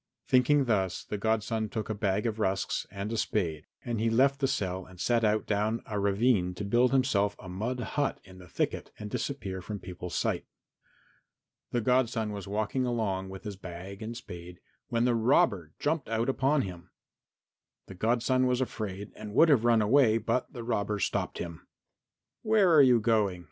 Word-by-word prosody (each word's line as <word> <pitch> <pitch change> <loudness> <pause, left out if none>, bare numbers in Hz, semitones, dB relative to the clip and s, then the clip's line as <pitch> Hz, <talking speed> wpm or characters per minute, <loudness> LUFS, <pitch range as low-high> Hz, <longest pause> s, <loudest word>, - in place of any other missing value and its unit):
Thinking 135 +2 +4
thus 95 -6 0
the 105 - -5
godson 110 0 0
took 110 0 -4
a 110 - -2
bag 105 0 0
of 110 -1 -2
rusks 95 -2 -1
and 100 +2 -5
a - - -1
spade, 80 -9 -1 0.2
and 120 -3 -2
he 115 +1 +2
left 135 +4 +3
the 135 - +2
cell 95 -5 -2
and 90 0 -15
set 120 +2 +1
out 110 0 +2
down 110 +2 0
a 105 -2 -3
ravine 100 -2 +2
to 100 - -5
build 120 +4 +3
himself 105 -7 +2
a 95 - -11
mud 110 +8 -3
hut 145 +2 -1
in 95 -1 -14
the 90 - -13
thicket - - -2
and 105 0 -7
disappear 100 -10 -3
from 105 +3 -5
people's 90 -3 -7
sight. - - -1 1.2
The 120 - 0
godson 115 -2 +1
was 100 -1 -6
walking 110 +6 -1
along 105 -6 -1
with 95 0 -9
his 100 -2 -6
bag 95 +2 -8
and 115 +2 -5
spade 90 -5 -10 0.3
when 120 -1 +1
the 125 - +3
robber 105 - +2
jumped 150 -4 -1
out 115 +2 0
upon 135 +2 +2
him. 90 -2 -8 1.0
The - - -10
godson 120 +6 +1
was 125 0 +1
afraid 105 -5 -4
and 105 0 -8
would 165 - +6
have 125 -6 +4
run 115 -2 +4
away, 115 0 +4
but 115 +3 -1
the 120 - -7
robber 105 -3 -1
stopped 100 - -1
him. 85 -2 -7 0.7
"Where 215 -5 +4
are 155 - +8
you 125 -3 +6
going?" 105 -5 +1
110 Hz, 185 wpm, -29 LUFS, 95-125 Hz, 1.2 s, are